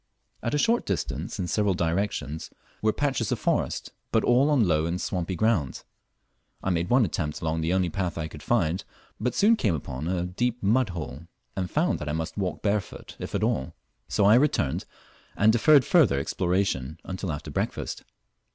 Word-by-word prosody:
At 115 Hz, -, -1 dB
a -, -, +3 dB
short 230 Hz, +10 st, +2 dB
distance -, -, -3 dB
in 90 Hz, -, -2 dB
several 105 Hz, 0 st, +1 dB
directions 85 Hz, -3 st, -2 dB, 0.3 s
were 110 Hz, -, +3 dB
patches 130 Hz, -4 st, -1 dB
of -, -, +1 dB
forest, -, -, -1 dB, 0.2 s
but -, -, +3 dB
all 125 Hz, +4 st, +4 dB
on 130 Hz, -9 st, +3 dB
low 80 Hz, -1 st, +2 dB
and 85 Hz, +2 st, -2 dB
swampy 90 Hz, 0 st, -2 dB
ground. 90 Hz, -, 0 dB, 0.8 s
I 95 Hz, -, +1 dB
made 85 Hz, 0 st, 0 dB
one 125 Hz, -2 st, +5 dB
attempt 75 Hz, -4 st, -3 dB
along 80 Hz, 0 st, -1 dB
the 80 Hz, +2 st, 0 dB
only 90 Hz, -2 st, +1 dB
path 90 Hz, -2 st, -2 dB
I 80 Hz, -1 st, -2 dB
could -, -, -11 dB
find, 85 Hz, +5 st, +1 dB, 0.4 s
but 125 Hz, -, -1 dB
soon 220 Hz, +3 st, +5 dB
came 105 Hz, -, +1 dB
upon 70 Hz, 0 st, -5 dB
a 90 Hz, -1 st, 0 dB
deep 120 Hz, +6 st, -2 dB
mud 115 Hz, +3 st, +3 dB
hole, 80 Hz, -3 st, -6 dB, 0.3 s
and 90 Hz, -2 st, -2 dB
found 160 Hz, -, +1 dB
that 75 Hz, -, -4 dB
I -, -, -1 dB
must 80 Hz, 0 st, -3 dB
walk 90 Hz, -6 st, -3 dB
barefoot 105 Hz, -1 st, -2 dB
if -, -, -5 dB
at -, -, 0 dB
all; 65 Hz, -, -1 dB, 0.3 s
so 100 Hz, -, +2 dB
I 105 Hz, -, +7 dB
returned 120 Hz, -, +2 dB, 0.5 s
and 105 Hz, +2 st, +5 dB
deferred 140 Hz, +3 st, +5 dB
further 155 Hz, -, +4 dB
exploration 85 Hz, -2 st, -1 dB, 0.2 s
till 95 Hz, -3 st, -3 dB
after 75 Hz, 0 st, -6 dB
breakfast. -, -, -3 dB
95 Hz, 185 wpm, -26 LUFS, 80-115 Hz, 0.8 s, I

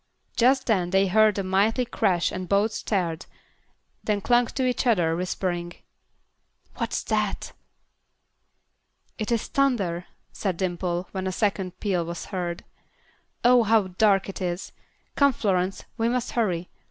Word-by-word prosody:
Just 260 Hz, +2 st, +3 dB
then 185 Hz, -6 st, +1 dB
they 190 Hz, +1 st, +3 dB
heard 215 Hz, +2 st, +4 dB
a 195 Hz, -, 0 dB
mighty 205 Hz, +6 st, +2 dB
crash 180 Hz, -7 st, +1 dB
and 185 Hz, -1 st, -5 dB
both 200 Hz, +2 st, +3 dB
started, 175 Hz, -5 st, -2 dB, 0.8 s
then 210 Hz, -1 st, 0 dB
clung 240 Hz, +3 st, +3 dB
to 260 Hz, +2 st, -2 dB
each 250 Hz, 0 st, 0 dB
other, 175 Hz, -8 st, +3 dB
whispering, 175 Hz, -1 st, -2 dB, 1.0 s
"What's -, -, -2 dB
that?" -, -, -1 dB, 1.7 s
"It 215 Hz, +1 st, -2 dB
is 230 Hz, -2 st, +1 dB
thunder," 200 Hz, -11 st, 0 dB, 0.3 s
said 190 Hz, -4 st, -2 dB
Dimple, 175 Hz, -1 st, -2 dB
when 190 Hz, -1 st, -3 dB
a -, -, -1 dB
second 190 Hz, -2 st, -1 dB
peal 185 Hz, -5 st, 0 dB
was 170 Hz, +1 st, -6 dB
heard. 175 Hz, -2 st, -3 dB, 0.8 s
"Oh, 245 Hz, 0 st, +6 dB
how 220 Hz, -3 st, +3 dB
dark 195 Hz, +1 st, +3 dB
it 195 Hz, -, -7 dB
is. 175 Hz, 0 st, -3 dB, 0.4 s
Come, 280 Hz, -1 st, +4 dB
Florence; 190 Hz, -4 st, -1 dB
we 225 Hz, +1 st, +2 dB
must 245 Hz, 0 st, -1 dB
hurry. 180 Hz, -7 st, -1 dB
195 Hz, 140 wpm, -25 LUFS, 180-225 Hz, 1.7 s, Oh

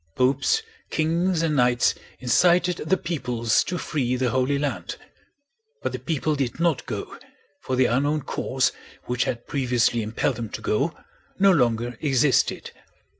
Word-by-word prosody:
Popes, 135 Hz, -, +2 dB, 0.3 s
kings, 165 Hz, +2 st, +1 dB
and 155 Hz, -2 st, +1 dB
knights 125 Hz, -2 st, +3 dB, 0.3 s
incited 175 Hz, +7 st, +3 dB
the 165 Hz, +5 st, 0 dB
peoples 125 Hz, -10 st, 0 dB
to 180 Hz, -, -3 dB
free 130 Hz, -7 st, -1 dB
the 125 Hz, -2 st, 0 dB
Holy 130 Hz, +3 st, +1 dB
Land; 130 Hz, -12 st, -3 dB, 0.9 s
but -, -, -1 dB
the -, -, -5 dB
people 155 Hz, -1 st, -1 dB
did 135 Hz, 0 st, -2 dB
not 170 Hz, -4 st, +1 dB
go, 105 Hz, -4 st, -6 dB, 0.4 s
for 130 Hz, -, -2 dB
the 130 Hz, 0 st, +4 dB
unknown 145 Hz, +5 st, +1 dB
cause 130 Hz, +1 st, 0 dB, 0.3 s
which 125 Hz, 0 st, -1 dB
had 120 Hz, -1 st, -3 dB
previously 125 Hz, -4 st, +1 dB
impelled 110 Hz, +3 st, -1 dB
them 115 Hz, -3 st, -5 dB
to -, -, -7 dB
go 140 Hz, +10 st, 0 dB, 0.4 s
no 195 Hz, 0 st, +5 dB
longer 120 Hz, -6 st, +1 dB
existed. 135 Hz, -2 st, +2 dB
130 Hz, 145 wpm, -24 LUFS, 120-160 Hz, 0.9 s, no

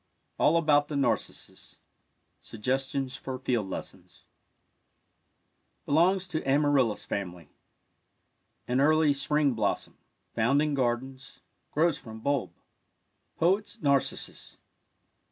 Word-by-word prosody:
ALL 160 Hz, +3 st, +4 dB
ABOUT 145 Hz, -3 st, +3 dB
THE 150 Hz, -, -5 dB
NARCISSUS 140 Hz, -, -2 dB, 0.6 s
SUGGESTIONS 130 Hz, +3 st, -2 dB
FOR 130 Hz, -1 st, -5 dB
FIELD 120 Hz, -6 st, -1 dB
LESSONS -, -, -8 dB, 1.6 s
Belongs 180 Hz, +5 st, +3 dB
to 160 Hz, -3 st, -2 dB
amaryllis 135 Hz, -5 st, +2 dB
family. 90 Hz, -6 st, -5 dB, 1.2 s
An 125 Hz, +2 st, +1 dB
early 155 Hz, 0 st, +4 dB
spring 145 Hz, 0 st, +1 dB
blossom— -, -, -2 dB, 0.3 s
found 120 Hz, +5 st, +2 dB
in 150 Hz, 0 st, +1 dB
gardens 130 Hz, +1 st, -3 dB
— -, -, -47 dB
grows 160 Hz, 0 st, +2 dB
from 110 Hz, -1 st, -10 dB
bulb. 140 Hz, +3 st, -1 dB, 0.9 s
Poet's 195 Hz, +7 st, +1 dB
Narcissus. 140 Hz, -2 st, -1 dB
140 Hz, 100 wpm, -28 LUFS, 125-150 Hz, 1.6 s, ALL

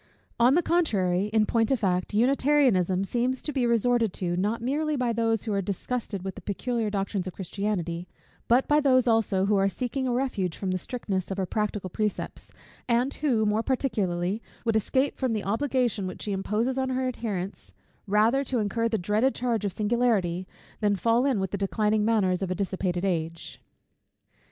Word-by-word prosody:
On 245 Hz, +4 st, +5 dB
the 350 Hz, -, +3 dB
contrary, 200 Hz, -, +1 dB
in 215 Hz, 0 st, +2 dB
point 225 Hz, 0 st, +1 dB
of 270 Hz, -, +3 dB
fact, 185 Hz, -3 st, 0 dB
Unitarianism 245 Hz, -7 st, +3 dB
seems 245 Hz, +5 st, -1 dB
to 300 Hz, -, -4 dB
be 255 Hz, -3 st, +1 dB
resorted 235 Hz, -2 st, +2 dB
to, 175 Hz, -2 st, -2 dB
not 205 Hz, +6 st, 0 dB
merely 295 Hz, +6 st, -1 dB
by 250 Hz, -3 st, 0 dB
those 225 Hz, -2 st, +1 dB
who 220 Hz, -, -2 dB
are 200 Hz, -, +1 dB
disgusted 200 Hz, +1 st, -3 dB
with 190 Hz, 0 st, -4 dB
the -, -, -10 dB
peculiar 225 Hz, +2 st, -2 dB
doctrines 195 Hz, -2 st, -2 dB
of 185 Hz, -, -5 dB
Christianity; 180 Hz, -3 st, -3 dB, 0.4 s
but 245 Hz, +3 st, +3 dB
by 295 Hz, 0 st, +4 dB
those 255 Hz, -4 st, +3 dB
also 220 Hz, -4 st, +2 dB
who 205 Hz, 0 st, +2 dB
are 195 Hz, 0 st, +3 dB
seeking 255 Hz, +4 st, -3 dB
a -, -, 0 dB
refuge 240 Hz, -9 st, -1 dB
from 190 Hz, -2 st, -2 dB
the 185 Hz, -, -1 dB
strictness 195 Hz, -5 st, -3 dB
of 195 Hz, -, -3 dB
her 190 Hz, -, 0 dB
practical 210 Hz, -1 st, -2 dB
precepts; 210 Hz, +3 st, -3 dB, 0.4 s
and 245 Hz, +3 st, +2 dB
who, 240 Hz, -8 st, +2 dB
more 210 Hz, +1 st, +2 dB
particularly, 210 Hz, -7 st, -1 dB, 0.2 s
would 225 Hz, -1 st, +1 dB
escape 260 Hz, +6 st, +1 dB
from 255 Hz, -4 st, 0 dB
the 215 Hz, -2 st, -2 dB
obligation 235 Hz, -2 st, 0 dB
which 185 Hz, -, -7 dB
she 210 Hz, -, -3 dB
imposes 215 Hz, +7 st, -1 dB
on 260 Hz, 0 st, 0 dB
her 260 Hz, 0 st, 0 dB
adherents, 205 Hz, -6 st, -4 dB, 0.4 s
rather 220 Hz, +7 st, +3 dB
to 260 Hz, -2 st, -2 dB
incur 230 Hz, +2 st, 0 dB
the 225 Hz, -, 0 dB
dreaded 210 Hz, +8 st, +1 dB
charge 235 Hz, -3 st, -1 dB
of 200 Hz, -, 0 dB
singularity, 205 Hz, -4 st, 0 dB, 0.3 s
than 205 Hz, -1 st, +2 dB
fall 230 Hz, +6 st, +2 dB
in 260 Hz, -7 st, +1 dB
with 190 Hz, -1 st, -2 dB
the 200 Hz, -, -3 dB
declining 210 Hz, +2 st, +1 dB
manners 200 Hz, -5 st, +2 dB
of 190 Hz, -, -2 dB
a 185 Hz, -, -1 dB
dissipated 185 Hz, -1 st, -2 dB
age. 165 Hz, -3 st, -3 dB
215 Hz, 185 wpm, -27 LUFS, 195-245 Hz, 0.4 s, On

